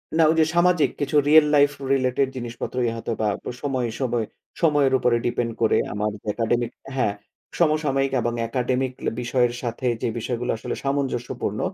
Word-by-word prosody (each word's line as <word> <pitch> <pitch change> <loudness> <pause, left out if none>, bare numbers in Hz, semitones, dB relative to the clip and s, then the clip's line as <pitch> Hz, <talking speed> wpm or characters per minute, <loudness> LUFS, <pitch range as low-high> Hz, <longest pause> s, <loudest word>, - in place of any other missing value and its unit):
না 165 - +5
ঐযে 160 -1 +3
সামাজিক 175 -2 +4
কিছু 145 +1 -2
রিয়াল 155 0 +8
লাইফ 145 0 +6 0.2
রিলেটেড 130 0 +1
জিনিসপত্রই 120 0 -3
হয়তোবা 115 -1 -2 0.2
প - - -29 0.2
সময় 130 -4 -1
সময় 120 -3 0 0.4
সময়ের 145 -4 +3
উপরে 120 -1 +2
ডিপেন্ড 120 -1 -1
করে 110 - +3 0.2
আমার 105 +1 -1 0.2
একাডেমিক 120 +1 0 0.2
হ্যাঁ, 115 -6 +1 0.5
সমসাময়িক 150 -4 +2
এবং 120 +1 -1
একাডেমিক 125 +2 -1
ল - - 0
বিষয়ের 120 0 +1
সাথে 120 +1 -3
যে - - 0
বিষয়গুলো 120 +1 -2
আসলে - - -4
সামঞ্জস্যপূর্ণ 135 -3 -2
125 Hz, 150 wpm, -23 LUFS, 120-140 Hz, 0.5 s, রিয়াল